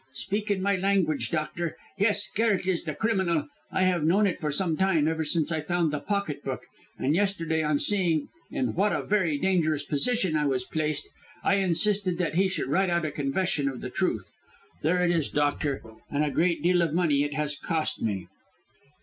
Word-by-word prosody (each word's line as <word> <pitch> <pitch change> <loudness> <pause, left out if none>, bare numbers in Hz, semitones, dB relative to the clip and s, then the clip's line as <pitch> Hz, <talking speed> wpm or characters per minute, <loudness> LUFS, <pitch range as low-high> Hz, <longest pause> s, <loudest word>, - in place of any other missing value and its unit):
"Speak 205 +9 -3
in 195 -2 0
my 200 0 +2
language, 185 -5 +1
doctor. 160 +1 -2 0.2
Yes, 205 0 +1
Garret 215 -4 +2
is 180 -2 0
the 155 -3 -3
criminal. 190 -9 +1 0.3
I 190 - +1
have 180 -4 +2
known 190 +7 +4
it 185 - 0
for 150 -2 -1
some 165 +2 0
time, 170 -4 +2
ever 160 0 0
since 155 0 0
I 160 -1 0
found 170 -2 0
the 150 - -1
pocket 200 -4 -2
book, - - -4 0.3
and 140 - +1
yesterday, 165 -4 +1
on 150 -1 +1
seeing 170 -5 +1 0.2
in 255 - -1
what 200 +3 +2
a - - -1
very 185 -8 +1
dangerous 155 -4 +1
position 185 - 0
I 150 -1 +2
was 130 -2 0
placed, 155 0 -2 0.4
I 200 - +3
insisted 190 0 +2
that 170 -4 -1
he 190 +3 +3
should 185 - -2
write 190 +6 +2
out 170 -1 +1
a 155 - -2
confession 145 +1 0
of 130 -2 -7
the - - -5
truth. - - -1 0.5
There 180 +4 +2
it 175 - +3
is, 165 -4 +1
doctor; 145 -1 0 0.3
and 145 +1 +1
a 145 - -1
great 170 -1 +1
deal 175 0 +4
of 165 -2 0
money 155 -6 +3
it 145 +1 -1
has 150 -1 0
cost 160 +2 -2
me." 100 -5 -2
170 Hz, 200 wpm, -27 LUFS, 150-190 Hz, 0.5 s, known